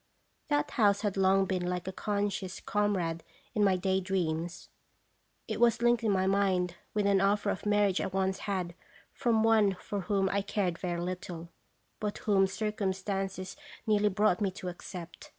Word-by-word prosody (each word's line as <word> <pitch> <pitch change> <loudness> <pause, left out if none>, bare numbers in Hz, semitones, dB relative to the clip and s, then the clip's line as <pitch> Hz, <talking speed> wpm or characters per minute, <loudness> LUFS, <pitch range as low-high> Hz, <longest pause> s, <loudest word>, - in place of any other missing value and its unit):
That 295 0 +1
house 205 -3 +3
had 205 -3 -1
long 195 0 +4
been 185 -2 -1
like 180 0 -3
a - - -1
conscious 200 -1 -2
comrade 190 -6 0 0.3
in 215 -3 +2
my 195 -2 +4
day 190 +1 +1
dreams. 175 -2 -2 0.8
It - - -3
was 235 0 +3
linked 240 0 +3
in 220 - +2
my 190 -1 +2
mind 190 -2 +2 0.2
with 210 -1 +2
an 200 -1 +4
offer 200 +1 +2
of 200 - -4
marriage 205 -2 +3
I - - -1
once 190 0 -1
had 180 -3 -1 0.4
from 230 -4 +2
one 215 -3 +4
for 200 +2 -5
whom 195 0 +1
I 200 +1 +1
cared 195 -4 -1
very 175 -2 -2
little, 175 -1 -5 0.5
but 210 -1 -2
whom 195 -3 +3
circumstances 195 -2 -2 0.3
nearly 210 -1 +3
brought 205 -1 +2
me 200 - +2
to 185 -1 -6
accept. 175 -1 -9
195 Hz, 170 wpm, -30 LUFS, 185-205 Hz, 0.8 s, long